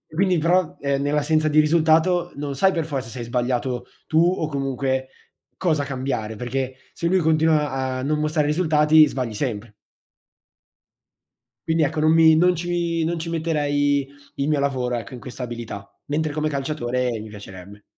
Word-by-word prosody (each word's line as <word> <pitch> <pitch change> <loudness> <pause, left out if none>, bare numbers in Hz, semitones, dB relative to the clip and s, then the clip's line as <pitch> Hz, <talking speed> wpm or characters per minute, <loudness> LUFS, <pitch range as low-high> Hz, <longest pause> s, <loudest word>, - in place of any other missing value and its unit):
quindi 185 -2 +2
però, 175 +1 +1
eh, 140 -1 0
nell'assenza 150 +2 +1
di 155 0 +4
risultato 160 +3 +3
non 140 -1 -4
sai 190 +7 +3
per 165 -3 -1
forza 135 -6 -4
se 125 - -8
hai 120 - -4
sbagliato 125 +1 -1 0.2
tu 155 - 0
o 170 -2 +2
comunque 135 -2 -2 0.5
cosa 155 -6 0
cambiare 130 -5 -3
perché 130 +3 -3 0.2
se 170 - -5
lui 185 +2 +3
continua 155 -2 +2
a 130 -1 -3
non 150 +3 0
mostrare 155 0 0
risultati 155 -1 +4
sbagli 125 -6 -3
sempre. 110 -3 -4 1.9
Quindi 160 -1 +2
ecco, 150 +2 -1
non 155 +1 +4
mi 160 -1 +6
non 180 +2 +4
ci 170 -1 -1
non 165 +1 -1
ci 165 +1 -5
metterei 145 -4 0 0.3
il 140 - -1
mio 150 -2 +2
lavoro 130 -3 -1
ecco, 120 +3 -6
in 125 - -7
questa 125 +2 -8
abilità. 115 -4 -7 0.2
Mentre 150 +1 -1
come 155 0 -1
calciatore 125 -3 -2
mi 110 0 -9
piacerebbe. 100 -1 -11
145 Hz, 165 wpm, -22 LUFS, 130-160 Hz, 1.9 s, mi